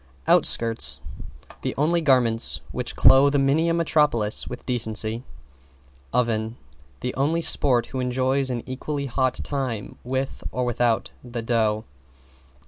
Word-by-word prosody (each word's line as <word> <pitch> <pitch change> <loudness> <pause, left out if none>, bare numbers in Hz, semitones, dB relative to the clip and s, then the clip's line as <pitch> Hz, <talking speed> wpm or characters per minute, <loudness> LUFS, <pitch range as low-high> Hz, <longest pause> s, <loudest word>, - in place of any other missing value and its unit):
=OUTSKIRTS= 110 - +4 0.6
The - - -3
only 165 +4 +1
garments 125 -6 +2
which - - -4
clothe 135 +3 +5
many 140 +4 +2
a - - +1
metropolis 150 -10 +1
with - - -8
decency. 110 -1 -2 0.9
=OVEN= 115 -1 -1 0.4
The 125 - -3
only 155 +5 0
sport 125 -7 +2
who 130 - -3
enjoys 130 +2 0
an 120 -2 -3
equally 140 +3 -4
hot 130 0 0
time 130 -7 -4
with 130 +2 -4
or 125 0 -2
without 120 -1 0
the 120 -2 -6
dough. 110 -2 0
125 Hz, 125 wpm, -23 LUFS, 115-140 Hz, 0.9 s, clothe